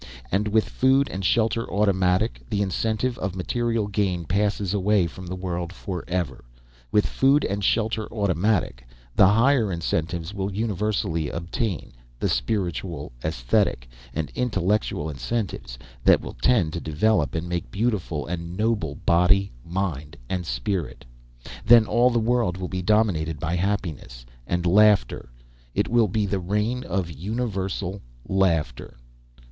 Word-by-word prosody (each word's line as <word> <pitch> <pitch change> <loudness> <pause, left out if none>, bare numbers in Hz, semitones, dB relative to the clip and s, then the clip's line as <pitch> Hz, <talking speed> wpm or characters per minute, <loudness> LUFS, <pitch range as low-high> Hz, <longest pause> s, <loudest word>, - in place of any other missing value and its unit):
And 100 +3 +1
with 110 +1 +2
food 135 +2 +3
and 95 +1 -5
shelter 115 +3 +1
automatic, 95 +1 +1
the 100 -2 +1
incentive 110 +5 -1
of 95 -1 -3
material 115 +3 -1
gain 95 -4 -1
passes 100 +2 0
away 100 -1 +3
from 90 +2 -8
the 90 - -4
world 90 -2 -4
for 90 -1 -5
ever. 90 -6 -2 0.5
With 105 - +3
food 140 +2 +3
and 100 +1 -2
shelter 110 +1 0
automatic, 100 - 0 0.3
the 95 - +7
higher 115 +1 +3
incentives 85 +1 -2
will 100 -1 -3
universally 100 -6 -1
obtain 90 - -3 0.3
the - - 0
spiritual, 85 - -2
aesthetic, - - 0 0.2
and 80 +2 -3
intellectual 105 -8 0
incentives 80 - -4 0.3
that - - +6
will - - -8
tend 80 - +2
to 85 - -2
develop 80 +2 +1
and 80 +2 -2
make 85 -7 -3
beautiful 95 - -1
and 85 +2 -5
noble 110 0 0
body, 95 +3 +4
mind, 85 -5 -3
and 90 +1 -3
spirit. 75 +9 -3 0.6
Then 115 0 +7
all 120 +4 +3
the 120 - 0
world 115 -5 +1
will 95 -1 -4
be 90 0 -3
dominated 90 -7 +1
by 80 +3 -1
happiness 85 -10 -3 0.2
and 90 0 -1
laughter. 100 -7 +4 0.5
It - - +1
will 115 -2 +4
be 105 +2 0
the 100 0 -1
reign 105 +7 -1
of 90 -2 -2
universal 100 - -3 0.3
laughter. 85 -13 0
95 Hz, 140 wpm, -24 LUFS, 85-110 Hz, 0.6 s, the